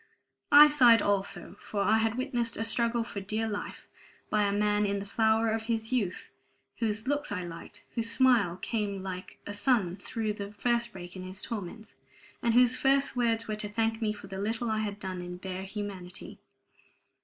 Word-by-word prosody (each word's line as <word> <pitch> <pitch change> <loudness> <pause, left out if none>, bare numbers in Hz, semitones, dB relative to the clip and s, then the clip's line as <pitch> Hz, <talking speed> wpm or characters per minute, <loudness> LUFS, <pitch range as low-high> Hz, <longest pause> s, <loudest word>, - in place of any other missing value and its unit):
I 295 +1 +10
sighed 245 -7 +6
also, 200 -1 -1
for 205 - -3
I 220 +1 +4
had 225 +1 0
witnessed 245 -3 -1
a 225 - -1
struggle 235 +1 +2
for 205 -3 -6
dear 215 +3 -2
life 205 -1 -5 0.5
by 210 -1 +3
a 200 - +1
man 210 0 +2
in 200 -1 0
the 200 - -5
flower 220 +2 +2
of 220 0 -2
his 225 +1 -1
youth, 205 -8 -2 0.5
whose 220 0 -1
looks 290 -2 0
I 185 -3 -2
liked, 175 +4 -9
whose 230 -1 +1
smile 230 -8 +3
came 200 -1 -3
like 185 -1 -7
the 205 - -5
sun 205 -4 +1
through 215 +1 -3
the 205 0 -7
first 235 +2 0
break 175 -1 -9
in 185 - -7
his 185 +2 -4
torments, 215 0 -6 0.5
and 235 -1 +1
whose 250 0 +6
first 275 +1 +2
words 230 -2 +1
were 215 - -2
to 210 -1 -4
thank 225 +1 -1
me 215 -1 +1
for 205 -1 -9
the 195 0 -7
little 225 +2 -1
I 215 - 0
had 205 -1 -3
done 185 -2 -5
in 180 0 -7
bare 190 +1 -6
humanity. 195 -3 -7
215 Hz, 190 wpm, -29 LUFS, 200-230 Hz, 0.5 s, I